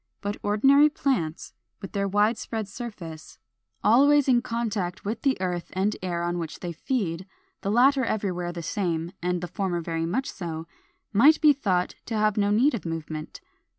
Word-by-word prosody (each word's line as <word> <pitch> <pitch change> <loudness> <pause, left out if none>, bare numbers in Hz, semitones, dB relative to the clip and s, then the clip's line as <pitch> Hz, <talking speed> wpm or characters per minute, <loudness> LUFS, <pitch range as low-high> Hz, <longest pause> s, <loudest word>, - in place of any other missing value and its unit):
But 205 0 -3
ordinary 270 +9 +5
plants, 200 - -2 0.3
with 195 - -8
their 200 0 -1
wide 205 +4 +2
spread 220 -3 -4
surface, 195 -8 -8 0.5
always 285 +5 +5
in 245 -2 +4
contact 220 -8 -3
with 215 +3 -3
the 270 -7 +1
earth 180 -2 -3
and 195 +3 0
air 175 -2 -2
on 175 0 -1
which 165 -2 -6
they 175 - -4
feed, 185 - -2 0.3
the 195 - -2
latter 260 +5 +4
everywhere 185 -6 -2
the 170 -1 -6
same, 170 -2 -2
and 180 0 -1
the 175 - -4
former 180 -1 -2
very 165 0 -2
much 260 +11 -1
so, 165 -4 -5 0.5
might 285 +10 +6
be 305 -2 +6
thought 185 -10 0
to 225 - -2
have 215 -1 +2
no 205 -1 +2
need 240 +8 +3
of 230 - -3
movement. 160 -2 -6
200 Hz, 175 wpm, -26 LUFS, 175-235 Hz, 0.5 s, might